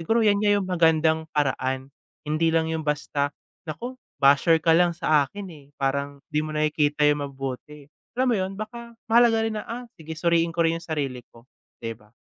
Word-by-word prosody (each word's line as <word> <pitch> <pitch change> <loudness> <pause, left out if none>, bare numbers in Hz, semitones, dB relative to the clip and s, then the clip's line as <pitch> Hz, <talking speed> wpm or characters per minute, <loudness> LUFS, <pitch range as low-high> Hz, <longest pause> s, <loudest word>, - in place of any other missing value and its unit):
Siguro 225 +7 +2
'yan 205 -1 +4
nga 210 -1 +3
'yung 200 - -1
magandang 160 -3 +2
paraan, 130 -1 -1 0.3
hindi 155 +2 +1
lang 160 0 +1
'yung 160 - -1
basta, 145 -1 -1 0.4
"Naku 245 - -6 0.2
basher 140 +4 +5
ka 160 +1 +2
lang 170 0 +3
sa 155 -5 +2
akin, 200 +3 -8
eh, 145 -3 -15
parang 140 +1 -2
di 150 - +2
mo 155 0 -4
nakikita 150 -1 +1
'yung 145 -1 +2
mabuti." 135 +2 -7 0.3
Alam 255 +1 +2
mo - - +3
'yun, 185 +1 -2
baka 235 +2 -8
mahalaga 230 0 +5
rin 215 -1 -2
na, - - -12
"Ah, 245 +2 -5 0.2
sige 160 0 -7
suriin 170 0 +2
ko 170 0 0
rin 165 0 +1
'yung 170 - -15
sarili 140 -5 -2
ko." 115 +1 -19 0.3
'Di 115 -1 -5
ba? 105 -1 -18
160 Hz, 195 wpm, -25 LUFS, 145-185 Hz, 0.4 s, basher